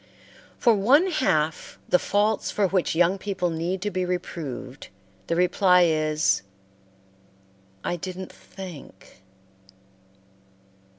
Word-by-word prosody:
For 235 Hz, -, +4 dB
one 275 Hz, -, +4 dB
half 155 Hz, -, 0 dB
the 180 Hz, -, +4 dB
faults 210 Hz, +1 st, 0 dB
for 205 Hz, -, +1 dB
which 185 Hz, -3 st, 0 dB
young 175 Hz, +3 st, +3 dB
people 190 Hz, -3 st, -2 dB
need 175 Hz, +3 st, -3 dB
to 205 Hz, -, -2 dB
be 185 Hz, 0 st, -1 dB
reproved 165 Hz, -7 st, -5 dB, 0.4 s
the 165 Hz, -, 0 dB
reply 180 Hz, +1 st, +4 dB
is, 155 Hz, -, +2 dB, 1.4 s
"I 175 Hz, -, -2 dB
didn't 185 Hz, +2 st, -7 dB
think." 180 Hz, -, -12 dB
180 Hz, 105 wpm, -25 LUFS, 165-195 Hz, 1.4 s, For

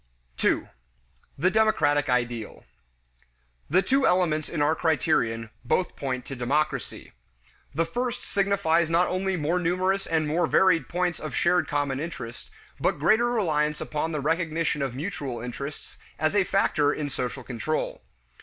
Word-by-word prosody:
2. -, -, +1 dB, 0.7 s
The 180 Hz, +6 st, +2 dB
Democratic 145 Hz, -10 st, +3 dB
Ideal. 120 Hz, -3 st, -2 dB, 1.0 s
The 185 Hz, +6 st, +4 dB
two 270 Hz, 0 st, +3 dB
elements 165 Hz, -4 st, +1 dB
in -, -, -3 dB
our 145 Hz, +2 st, +3 dB
criterion 115 Hz, -9 st, 0 dB
both 180 Hz, +9 st, 0 dB
point 130 Hz, -2 st, -3 dB
to 135 Hz, -, -6 dB
democracy. 140 Hz, +5 st, -2 dB, 0.6 s
The 165 Hz, +2 st, +2 dB
first 245 Hz, +7 st, -3 dB
signifies 195 Hz, -5 st, +1 dB
not 170 Hz, +2 st, +3 dB
only 190 Hz, 0 st, -1 dB
more 165 Hz, +3 st, 0 dB
numerous 185 Hz, +3 st, 0 dB
and 160 Hz, -2 st, +1 dB
more 165 Hz, +3 st, +1 dB
varied 165 Hz, -2 st, +3 dB
points 175 Hz, -1 st, -1 dB
of 155 Hz, -4 st, -5 dB
shared 175 Hz, +1 st, +2 dB
common 145 Hz, -2 st, -1 dB
interest, 125 Hz, -7 st, -7 dB, 0.3 s
but -, -, +1 dB
greater 235 Hz, +2 st, +3 dB
reliance 150 Hz, -10 st, +1 dB
upon 155 Hz, +2 st, -2 dB
the 150 Hz, -3 st, -2 dB
recognition 160 Hz, 0 st, 0 dB
of 135 Hz, -3 st, -2 dB
mutual 140 Hz, -6 st, -4 dB
interests 130 Hz, +5 st, -7 dB, 0.2 s
as 155 Hz, +4 st, 0 dB
a 200 Hz, -2 st, +4 dB
factor 150 Hz, -6 st, +2 dB
in 150 Hz, -1 st, -3 dB
social 130 Hz, -1 st, -4 dB
control. 130 Hz, +6 st, -3 dB
155 Hz, 145 wpm, -26 LUFS, 140-180 Hz, 1.0 s, The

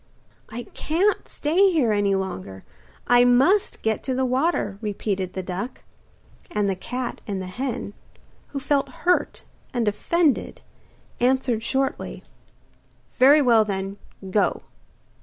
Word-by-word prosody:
'I 240 Hz, +2 st, -6 dB
can't 370 Hz, +7 st, 0 dB
stay 370 Hz, +6 st, +3 dB
here 280 Hz, -10 st, +2 dB
any 205 Hz, -1 st, +2 dB
longer, 95 Hz, -, -5 dB, 0.4 s
I 245 Hz, 0 st, +5 dB
Must 270 Hz, +12 st, +3 dB
get 220 Hz, -1 st, 0 dB
to 260 Hz, -2 st, -1 dB
the 260 Hz, 0 st, +1 dB
water,' 255 Hz, -, 0 dB
repeated 195 Hz, -3 st, -3 dB
the 190 Hz, -, -4 dB
duck. 190 Hz, +7 st, -5 dB, 0.7 s
And 210 Hz, -1 st, 0 dB
the 195 Hz, -, 0 dB
cat 245 Hz, +6 st, -5 dB
and 200 Hz, -2 st, -2 dB
the 185 Hz, -, -5 dB
hen, 240 Hz, +1 st, -4 dB, 0.5 s
who 280 Hz, -, -5 dB
felt 280 Hz, 0 st, 0 dB, 0.2 s
hurt 360 Hz, 0 st, +1 dB, 0.3 s
and 235 Hz, -3 st, 0 dB
offended, 300 Hz, +8 st, +1 dB, 0.6 s
answered 250 Hz, -2 st, +2 dB
shortly: 270 Hz, +3 st, -2 dB, 1.0 s
'Very 285 Hz, +3 st, +7 dB
well 230 Hz, -4 st, +5 dB
then, 195 Hz, -1 st, -4 dB, 0.3 s
go. 205 Hz, +1 st, +1 dB
245 Hz, 125 wpm, -24 LUFS, 200-275 Hz, 1.0 s, Very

